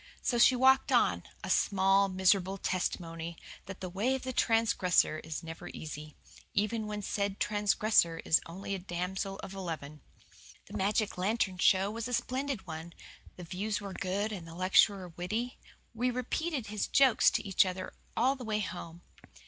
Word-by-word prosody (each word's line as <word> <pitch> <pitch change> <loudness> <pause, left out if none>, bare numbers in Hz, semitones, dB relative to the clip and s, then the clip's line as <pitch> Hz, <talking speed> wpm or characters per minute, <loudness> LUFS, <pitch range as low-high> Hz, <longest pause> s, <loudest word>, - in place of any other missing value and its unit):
So 240 - +1
she 255 - +7
walked 265 +1 +4
on, - - +3 0.2
a - - -5
small, 195 0 +3
miserable 190 0 +2
testimony 170 -3 -3 0.3
that 195 0 -8
the 185 - -3
way 215 +9 0
of 265 - -5
the 260 0 -4
transgressor 215 -9 +2
is 160 0 -6
never 165 +2 -8
easy, 150 -1 -8 0.4
even 215 +1 0
when 210 -1 -4
said 200 0 -2
transgressor 210 -4 +2
is 160 - +4
only 190 +4 -6
a 195 - -2
damsel 190 +2 -4
of 195 - -7
eleven. 160 -6 -6 0.6
The - - -11
magic 205 0 0
lantern 190 -1 0
show 195 +2 +4
was 230 +1 -4
a 250 - -5
splendid 255 -1 -2
one. 165 0 -7 0.4
The 180 - -9
views 200 +5 -3
were 200 -2 -7
good 200 +4 -2
and 180 -6 -6
the 165 - -10
lecturer 185 +1 +3
witty. 215 +9 -4 0.3
We 245 +2 0
repeated 255 +3 -2
his 210 0 -2
jokes 265 -4 +5
to - - -2
each 195 - +5
other 185 0 -5 0.2
all 260 +4 +3
the 260 - -9
way 215 -2 -1
home. 175 -3 -7
195 Hz, 165 wpm, -31 LUFS, 180-220 Hz, 0.6 s, she